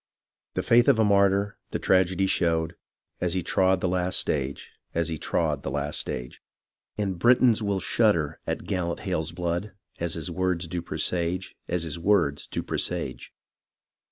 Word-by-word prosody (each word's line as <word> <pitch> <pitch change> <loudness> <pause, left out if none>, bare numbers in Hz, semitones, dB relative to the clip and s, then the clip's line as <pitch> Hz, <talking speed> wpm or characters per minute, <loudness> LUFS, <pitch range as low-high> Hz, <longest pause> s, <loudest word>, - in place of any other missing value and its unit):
The - - -1
faith 120 +1 +5
of 140 -5 +5
a 110 - +4
martyr, 100 0 +3
the - - -2
trajedy 95 0 +2
shewed. 85 -2 +1 0.4
As 90 0 0
he 90 - 0
trod 95 +1 +2
the - - +1
last 90 0 +1
stage; 70 -1 -2 0.2
as 85 0 +1
he 80 -2 -4
trod - - 0
the - - -4
last 75 +1 -1
stage. 60 0 -4 0.6
And 95 -4 -2
Britons 120 +1 +5
will 100 -2 0
shudder 90 -8 +1
at - - -3
gallant 85 -2 -2
Hale's 85 -5 -2
blood. 85 +4 -3 0.3
As 85 -1 -1
his 80 0 -4
words 90 0 0
do 85 +1 -4
presage, 90 +2 -1
as 85 -1 -1
his 80 0 -4
words 85 -6 +2
do - - -4
presage. - - -3
90 Hz, 160 wpm, -26 LUFS, 85-100 Hz, 0.6 s, faith